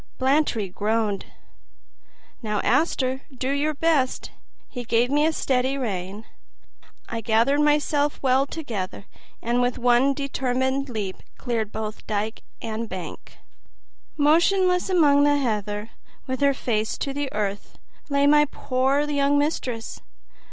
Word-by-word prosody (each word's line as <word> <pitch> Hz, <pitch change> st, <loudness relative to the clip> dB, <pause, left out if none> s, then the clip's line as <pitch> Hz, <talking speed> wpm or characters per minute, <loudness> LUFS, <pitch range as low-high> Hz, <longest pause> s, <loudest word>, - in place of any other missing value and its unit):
Blantyre 265 Hz, -6 st, +1 dB
groaned, 210 Hz, +1 st, -1 dB, 1.1 s
"Now, 210 Hz, -3 st, -1 dB
Auster, 260 Hz, 0 st, +1 dB
do 260 Hz, 0 st, -3 dB
your 295 Hz, +2 st, 0 dB
best!" 290 Hz, -4 st, +1 dB, 0.4 s
He 245 Hz, -, -6 dB
gave 240 Hz, +2 st, +1 dB
me 295 Hz, +2 st, +3 dB
a -, -, +2 dB
steady 265 Hz, -2 st, 0 dB
rein. 200 Hz, -3 st, -4 dB, 0.8 s
I 230 Hz, -1 st, -4 dB
gathered 230 Hz, +6 st, +2 dB
myself 295 Hz, 0 st, +2 dB
well 265 Hz, +1 st, +3 dB
together 215 Hz, -, -5 dB, 0.4 s
and 240 Hz, +2 st, +1 dB
with 245 Hz, 0 st, 0 dB
one 250 Hz, +3 st, +3 dB
determined 265 Hz, 0 st, -1 dB
leap 205 Hz, -5 st, -4 dB, 0.2 s
cleared 225 Hz, -4 st, -2 dB
both 215 Hz, 0 st, -6 dB
dike 215 Hz, +1 st, -2 dB, 0.2 s
and 225 Hz, 0 st, -4 dB
bank. 180 Hz, -3 st, -8 dB, 0.8 s
Motionless 360 Hz, +5 st, +3 dB
among 295 Hz, -6 st, +5 dB
the 290 Hz, 0 st, +4 dB
heather, 210 Hz, -4 st, -2 dB, 0.3 s
with 260 Hz, 0 st, -4 dB
her 280 Hz, -1 st, +4 dB
face 220 Hz, -4 st, -1 dB
to 275 Hz, -, -3 dB
the 285 Hz, -1 st, -3 dB
earth, 205 Hz, -1 st, -4 dB, 0.3 s
lay 280 Hz, 0 st, +2 dB
my 295 Hz, +1 st, +6 dB
poor 265 Hz, 0 st, 0 dB
young 285 Hz, -1 st, +2 dB
mistress. 260 Hz, -6 st, -2 dB
260 Hz, 125 wpm, -24 LUFS, 220-285 Hz, 1.1 s, my